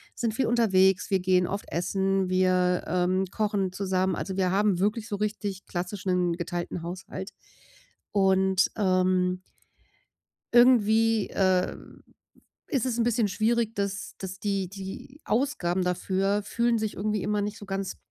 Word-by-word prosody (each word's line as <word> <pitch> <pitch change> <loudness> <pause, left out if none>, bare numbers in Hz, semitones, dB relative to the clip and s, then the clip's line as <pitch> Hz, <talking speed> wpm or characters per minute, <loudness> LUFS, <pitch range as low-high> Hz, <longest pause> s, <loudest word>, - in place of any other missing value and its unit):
sind 230 -3 -1
viel 265 +4 0
unterwegs, 190 -6 +3
wir 190 - +3
gehen 180 -1 +2
oft 200 +2 -4
essen, 190 +2 0
wir, 185 -1 +2
ähm, 185 +1 +1
kochen 205 -3 -1
zusammen. 190 -1 0
Also, 190 - -4
wir 185 -2 +1
haben 200 -1 +2
wirklich 210 +3 0
so 205 - -3
richtig 205 -2 -3
klassischen 180 -1 -1
geteilten 175 0 -4
Haushalt 185 +2 -7 0.8
und, 190 -1 +3
ähm 185 -2 +2 1.1
irgendwie, 225 -3 +4
äh, 185 -1 +1 0.9
ist 270 -7 0
es 240 -2 -1
'n - - +3
bisschen 235 -2 +1
schwierig, 225 +2 0
dass 200 0 -3
dass 190 -1 -6
die 200 -3 -1
die 195 - -9
Ausgaben 215 -8 0
dafür 195 +3 0
fühlen 235 +3 0
sich 215 -1 -2
irgendwie 210 0 -1
immer 210 0 0
nicht 205 +1 -3
so - - -10
ganz 195 -1 -3
195 Hz, 140 wpm, -27 LUFS, 185-215 Hz, 1.1 s, irgendwie